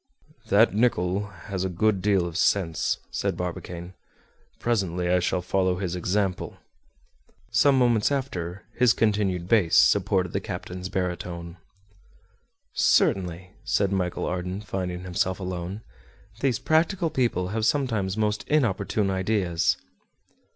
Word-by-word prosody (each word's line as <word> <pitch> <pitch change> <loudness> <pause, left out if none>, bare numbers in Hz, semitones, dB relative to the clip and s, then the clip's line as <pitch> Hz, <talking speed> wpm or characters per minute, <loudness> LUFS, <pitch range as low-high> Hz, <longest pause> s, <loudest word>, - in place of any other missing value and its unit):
"That 105 +3 +4
Nicholl 100 -3 +1
has 100 -1 -6
a 95 - -1
good 100 +2 +1
deal 95 -2 +2
of 85 -2 -6
sense," 90 -3 +1
said - - -2
Barbicane; 90 0 -5 0.6
"presently 95 -7 -1
I 90 0 +4
shall 90 0 -1
follow 95 0 +1
his 90 -2 -3
example." 95 +1 -1 0.9
Some 140 -2 +4
moments 120 -2 +3
after 95 -10 -3
his 125 -2 +4
continued 100 -5 0
bass 95 -6 +3
supported 95 -3 +3
the - - +1
captain's 90 +1 -6
baritone. 90 -2 -4 1.2
"Certainly," 90 -1 +2
said 100 -1 +1
Michel 90 -2 -1
Ardan, 90 +2 -3
finding 90 -4 -4
himself 95 +1 -1
alone, 90 +2 -5 0.6
"these 130 -1 +1
practical 160 +5 +1
people 105 -8 0
have 110 +2 -2
sometimes 110 -7 0
most 105 +3 -1
opportune 105 -7 +1
ideas." 95 -3 +1
95 Hz, 120 wpm, -26 LUFS, 90-110 Hz, 1.2 s, That